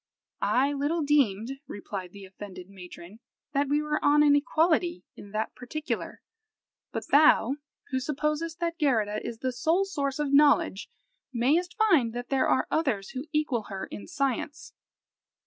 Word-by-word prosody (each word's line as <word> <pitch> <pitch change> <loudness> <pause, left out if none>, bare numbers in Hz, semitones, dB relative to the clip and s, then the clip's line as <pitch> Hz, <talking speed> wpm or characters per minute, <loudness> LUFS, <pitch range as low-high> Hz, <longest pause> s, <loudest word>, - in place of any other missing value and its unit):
"I 275 +3 +2
little 295 +4 0
deemed," 270 -3 +1
replied 195 -3 -6
the 200 0 -11
offended 190 -1 -10
matron, 180 +1 -12 0.3
"that 280 0 +1
we 295 +1 +2
were 300 0 -2
on 295 +1 +5
an 290 -1 +6
equality 320 - +1
in 200 - -12
that 215 +2 -3
particular 300 +5 -5 0.7
but - - -5
thou, 285 -3 +5 0.3
who 260 - +1
supposest 300 +4 -2
that 335 0 -2
Geirrida 220 -8 +1
is 235 - -5
the 255 +2 -2
sole 325 +10 +1
source 280 -8 -2
of 295 -2 -1
knowledge, 285 -8 +4 0.4
mayst 290 +9 +1
find 325 - +3
that 245 0 -6
there 270 -1 +2
are 260 - +2
others 245 -12 0
who 265 +1 -5
equal 295 -8 0
her 190 -1 -5
in - - -8
science." 290 0 -3
275 Hz, 150 wpm, -27 LUFS, 220-300 Hz, 0.7 s, an